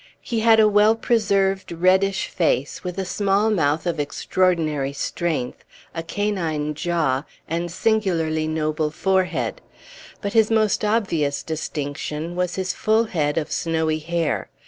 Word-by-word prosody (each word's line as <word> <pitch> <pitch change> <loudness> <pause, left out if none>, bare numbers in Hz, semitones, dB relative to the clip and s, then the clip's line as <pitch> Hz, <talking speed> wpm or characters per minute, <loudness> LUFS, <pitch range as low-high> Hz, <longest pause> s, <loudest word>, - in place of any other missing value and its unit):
He 235 -3 -2
had 225 0 +5
a 215 - +6
well 210 +1 +4
preserved 195 -5 +1
reddish 190 +3 +2
face, 145 -5 -1
with 180 0 -5
a 190 - -2
small 200 +3 +1
mouth 155 -4 +1
of 170 -3 -1
extraordinary 155 -2 0
strength, 150 -3 -3 0.3
a 165 - -3
canine 165 -5 -2
jaw, 155 -5 0 0.2
and 170 +1 -2
singularly 170 -6 0
noble 155 -1 -1
forehead; 190 - 0 0.6
but 200 -1 -4
his 220 -2 +4
most 215 -2 +2
obvious 175 -10 0
distinction 155 +1 -4
was 180 -1 -1
his 185 -1 -2
full 220 +1 +2
head 155 -9 -1
of 160 -1 -2
snowy 160 -2 0
hair. 170 0 -2
175 Hz, 135 wpm, -22 LUFS, 155-200 Hz, 0.6 s, a